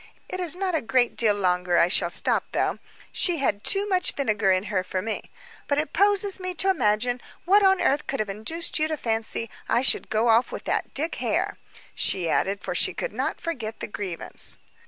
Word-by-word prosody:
It 370 - -4
is 350 -2 0
not 370 -1 -2
a 320 - +1
great 245 +1 +1
deal 215 -3 +2
longer 180 -2 +1
I 170 - +5
shall 180 -1 +2
stop, - - +2
though; - - 0 0.3
she 350 -2 +2
had 210 -8 -1
too 400 +1 +3
much 370 -2 +1
vinegar 215 -8 +1
in 185 0 +2
her 195 -3 -2
for 185 0 -3
me. 220 +3 -4 0.4
But 285 - 0
it 300 -1 -1
poses 400 0 +3
me 370 -1 -4
to 385 +1 +2
imagine 245 - 0 0.2
what 400 +4 +5
on 385 -1 +4
earth 285 +2 +1
could 275 - -3
have 215 - -1
induced 225 +14 -1
you 310 - +2
to 310 -1 -3
fancy 225 -1 -2 0.2
I 240 - +2
should - - +3
go 220 +2 +1
off 230 +2 +3
with - - -6
that - - -2
Dick 315 +4 0
Hare," - - -1 0.3
she 180 -3 0
added, 195 +4 0
for - - -3
she - - +1
could - - -4
not - - -2
forget 235 -10 -5
the - - -4
grievance. 190 -5 -3
245 Hz, 210 wpm, -25 LUFS, 205-340 Hz, 0.4 s, I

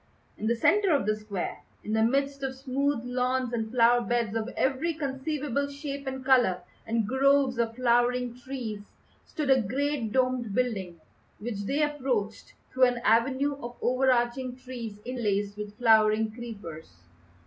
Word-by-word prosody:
In 215 - -4
the 235 - +2
centre 395 - +3
of 285 -8 +2
the 215 0 +1
square, 210 -4 -5 0.2
in 215 - -3
the 220 - +2
midst 275 +4 +1
of 265 -1 -3
smooth 270 0 -1
lawns 250 0 -1
and 225 -2 -2
flower 240 0 +4
beds 235 -2 -1
of 225 +1 -2
every 270 +5 0
conceivable 280 -1 -2
shape 280 -1 -6
and 265 0 -5
colour, 245 -9 +4 0.3
and 225 -1 +1
groves 270 0 +3
of 230 -1 0
flowering 245 0 +2
trees, 245 -4 -6 0.5
stood 295 -3 -1
a 260 -1 +5
great 260 +1 -1
domed 255 -4 0
building, 195 -9 -1 0.4
which 205 -2 -5
they 290 +7 +1
approached 255 -8 -2 0.2
through 255 0 +5
an 245 -1 +1
avenue 265 +5 +2
of 240 0 -7
overarching 250 0 +1
trees 250 -5 -7
interlaced 205 -5 -1
with 210 0 -7
flowering 220 -2 +4
creepers. 170 - -9
245 Hz, 150 wpm, -28 LUFS, 220-265 Hz, 0.5 s, a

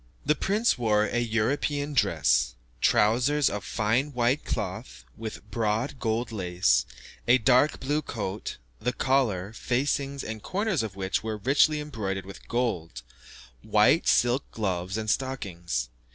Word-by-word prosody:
The 150 - +4
prince 205 - +1
wore 105 -3 +3
a 120 - -1
European 140 +6 0
dress: 70 - +2 0.3
trousers 130 +7 +3
of 100 -1 -4
fine 120 +6 0
white 125 +3 +1
cloth, - - -5
with 110 -1 -7
broad 115 +5 -1
gold 115 +1 -1
lace; 90 - +1 0.4
a 120 +2 +6
dark 130 +3 +3
blue 145 +3 0
coat, 105 -7 -5 0.2
the 125 +2 -1
collar, 110 -8 +1
facings, 135 +3 -1
and 110 -1 -6
corners 195 - -1
of 110 -4 -5
which 95 -1 -1
were 110 -1 -3
richly 145 +7 +3
embroidered 105 -10 -4
with 100 - -11
gold; 90 - -2 0.6
white - - +3
silk 120 +3 +3
gloves 95 -2 -2
and 110 0 -3
stockings. 90 - -2
115 Hz, 135 wpm, -27 LUFS, 95-135 Hz, 0.6 s, a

